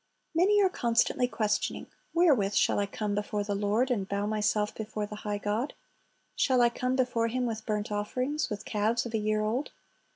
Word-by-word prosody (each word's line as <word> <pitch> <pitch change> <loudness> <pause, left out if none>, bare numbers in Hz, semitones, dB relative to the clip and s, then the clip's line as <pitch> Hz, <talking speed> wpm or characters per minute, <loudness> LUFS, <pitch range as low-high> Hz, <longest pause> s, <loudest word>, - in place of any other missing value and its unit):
Many 385 +5 +4
are - - +6
constantly 240 -3 +1
questioning, 215 -3 -1 0.3
"Wherewith 275 - +3
shall - - +3
I 200 - 0
come 205 +1 -3
before 205 0 -1
the 205 0 -2
Lord, 210 +6 +1
and 200 -5 -1
bow 200 0 -1
myself 210 0 0
before 215 -1 -4
the 210 0 -8
high 210 -1 -3
God? 210 +7 -2 0.6
Shall 255 -1 +3
I 240 - +5
come 250 +2 -1
before 245 -3 +1
Him 250 +2 -1
with 220 -2 -4
burnt 210 -1 -2
offerings, 250 +8 -1
with 210 -1 -5
calves 220 +3 0
of 235 - -6
a 220 - +1
year 215 0 0
old? 230 +7 -1
215 Hz, 190 wpm, -29 LUFS, 210-250 Hz, 0.6 s, are